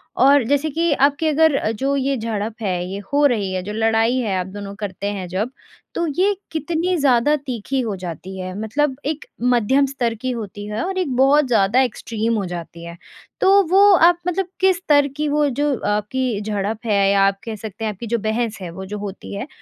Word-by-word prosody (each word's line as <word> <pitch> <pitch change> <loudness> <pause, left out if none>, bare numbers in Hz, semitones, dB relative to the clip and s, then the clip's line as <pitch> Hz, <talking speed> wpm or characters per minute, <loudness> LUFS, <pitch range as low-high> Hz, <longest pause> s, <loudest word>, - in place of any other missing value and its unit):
और 275 0 +5
जैसे 285 +2 +1
कि 330 +2 0
आपकी 285 +3 +3
अगर 300 -7 +3
जो 275 +5 -1
ये 275 +1 0
झड़प 220 -1 -3
है 190 -3 0 0.2
ये 195 - -4 0.2
हो 290 0 +4
रही 205 -7 -1
है 185 - -1
जो 210 +2 -5
लड़ाई 225 +2 +2
है 195 -7 0
दोनों 200 0 -7
करते 200 -1 -4
हैं 190 -3 -5
जब, 195 +7 -2 0.5
तो 340 - 0
ये 400 +1 +3 0.2
कितनी 335 +3 -1
ज़्यादा 275 +1 +3
तीखी 265 -1 -3
हो 215 -4 -3
जाती 180 +1 -7
है 185 0 -5
मतलब 265 +6 0
एक 305 +1 -3 0.3
मध्यम 265 +5 +3
स्तर 250 -4 -2
की 255 0 -1
होती 205 -3 -6
है 210 +2 -3
और 375 0 -3
एक 290 -9 -1
बहुत 275 +1 +4
ज़्यादा 230 +2 +3
एक्सट्रीम 230 -2 -2
हो 200 - -2
जाती 170 -1 -7
है, 170 0 -9 0.4
तो 395 +1 +6
वो 390 +1 +6
आप 345 +1 +5
मतलब 365 +1 0
किस 380 -2 +3
स्तर 290 -5 +3
की 300 0 0
वो 295 0 +2
जो 285 +2 0 0.2
आपकी 215 +1 -2
झड़प 210 +2 -3
है 200 -2 +3
या 200 0 +3
आप 195 0 -1
कह 225 -2 -5
सकते 215 +1 -7
हैं 215 - 0
आपकी 220 +4 -8
जो 235 - 0
बहस 220 +1 -1
है 175 - -5
वो 190 +2 -8
जो 210 +2 -6
होती 200 0 -7
है, 200 +8 -5
235 Hz, 210 wpm, -20 LUFS, 205-285 Hz, 0.5 s, तो